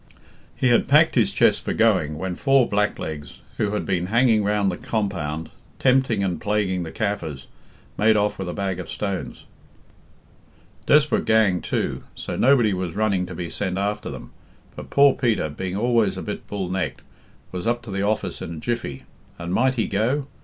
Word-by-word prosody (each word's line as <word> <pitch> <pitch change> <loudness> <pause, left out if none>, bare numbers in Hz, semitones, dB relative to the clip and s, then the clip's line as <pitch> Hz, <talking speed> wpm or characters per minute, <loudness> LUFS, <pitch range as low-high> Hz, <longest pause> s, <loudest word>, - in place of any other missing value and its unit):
"'He 130 - +2
had 120 - +3
packed - - +5
his - - +3
chest - - +3
for - - -2
going, 75 0 +2
when 95 +2 -3
four 135 +5 +3
blacklegs, 80 -7 -2 0.2
who 105 -1 0
had 105 - -2
been 90 -2 -1
hanging 115 0 +3
round 100 -1 +1
the 90 - -5
compound, 85 -8 -3 0.3
tempting 130 -5 +2
and 90 -4 -2
plaguing 100 -3 0
the 85 - -5
Kaffirs, 80 -10 -3 0.5
made 110 +1 +4
off 105 -1 0
with 95 -2 -3
a - - -4
bag 95 -3 -2
of 90 - -7
stones. 100 -3 -4 1.4
Desperate 150 0 +4
gang, 105 -6 +3
too; - - -2
so - - -5
nobody 120 -6 +4
was 90 -2 -3
running 100 -4 +1
to 90 - -7
be 85 0 -4
sent 95 +2 -3
after 100 +1 -2
them. - - -9 0.4
But - - -9
poor 140 -1 +5
Peter, 115 - 0
being 90 +5 -5
always 115 -2 +2
a - - -5
bit 105 - -6
bull 100 -3 -3
necked, 95 0 -3 0.5
was 90 +1 -4
up 120 0 0
to 115 - -8
the 95 0 -2
office 100 -3 -1
in 85 - -5
a - - -7
jiffy, 110 - -3 0.3
and 85 +1 -4
Might 130 +4 +2
he 115 - 0
go? 120 +8 0
100 Hz, 180 wpm, -23 LUFS, 90-110 Hz, 1.4 s, packed